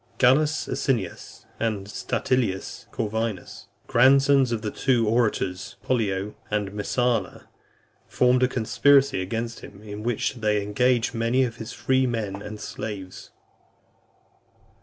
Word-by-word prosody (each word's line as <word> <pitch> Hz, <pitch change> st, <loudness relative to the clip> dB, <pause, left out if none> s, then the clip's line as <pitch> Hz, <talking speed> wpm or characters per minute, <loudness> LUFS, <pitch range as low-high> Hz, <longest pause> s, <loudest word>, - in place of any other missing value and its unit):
Gallus 150 Hz, +5 st, +3 dB
Asinius 115 Hz, -, -3 dB
and 105 Hz, -3 st, -2 dB
Statilius 105 Hz, -1 st, -2 dB
Corvinus, 110 Hz, -3 st, -4 dB, 0.2 s
grandsons 135 Hz, +1 st, +4 dB
of 115 Hz, -2 st, -2 dB
the 105 Hz, -, -2 dB
two 120 Hz, -4 st, +1 dB
orators, 105 Hz, -5 st, 0 dB
Pollio 105 Hz, -5 st, -1 dB, 0.2 s
and 105 Hz, -2 st, -1 dB
Messala, 110 Hz, +1 st, -1 dB, 0.6 s
formed 125 Hz, 0 st, +3 dB
a 130 Hz, -, +5 dB
conspiracy 135 Hz, 0 st, +3 dB
against 115 Hz, +4 st, -4 dB
him, 100 Hz, +1 st, -13 dB
in 105 Hz, 0 st, -7 dB
which 120 Hz, +2 st, -1 dB
they 105 Hz, -2 st, +1 dB
engaged 120 Hz, +3 st, +1 dB
many 115 Hz, +3 st, +1 dB
of 120 Hz, -2 st, -3 dB
his 115 Hz, +1 st, -7 dB
freedmen 115 Hz, -5 st, -1 dB
and 105 Hz, +1 st, -8 dB
slaves. 100 Hz, -3 st, -7 dB
115 Hz, 115 wpm, -25 LUFS, 105-125 Hz, 0.6 s, a